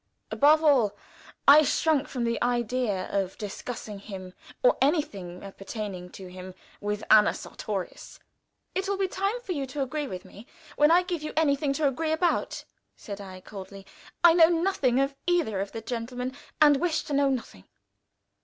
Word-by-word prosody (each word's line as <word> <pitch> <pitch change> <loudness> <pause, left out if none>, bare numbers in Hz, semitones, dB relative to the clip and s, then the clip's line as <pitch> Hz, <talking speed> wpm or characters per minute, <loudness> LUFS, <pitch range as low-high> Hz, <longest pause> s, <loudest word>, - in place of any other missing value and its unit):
Above 305 +2 +5
all, 240 -9 +3 0.5
I 290 +2 +10
shrunk 305 -1 +1
from 250 -3 -3
the 235 -1 -1
idea 240 -4 0
of 195 -2 -1
discussing 210 0 -6
him, 190 -3 -9 0.3
or - - +5
anything 200 - 0 0.2
pertaining 195 -3 -6
to 190 - -9
him, 185 0 -10 0.2
with 210 +1 -3
Anna 215 -1 +6
Sartorius. 195 -4 -6 0.6
"It 385 +1 -2
will 400 - 0
be 385 -1 +1
time 395 +6 -2
for 440 - -6
you 280 -6 -2
to 275 +2 -2
agree 295 +2 -3
with 185 -5 -7
me 210 +4 -14 0.3
when 295 +1 +5
I 350 +2 +5
give 355 -3 -3
you 305 - -5
anything 285 -2 +2
to 290 +1 +1
agree 310 +4 -1
about," 340 +2 0 0.3
said 200 -2 -8
I, 185 -2 -10
coldly. 195 0 -10 0.4
"I 340 -1 +8
know 330 -1 +7
nothing 330 -8 +1
of 275 +1 +1
either 330 - +1
of 200 - -4
the 225 - -6
gentlemen, 250 +3 -4 0.2
and 295 -2 +6
wish 325 +2 0
to 295 - -5
know 280 0 +3
nothing." 235 - -4
255 Hz, 170 wpm, -27 LUFS, 205-310 Hz, 0.6 s, I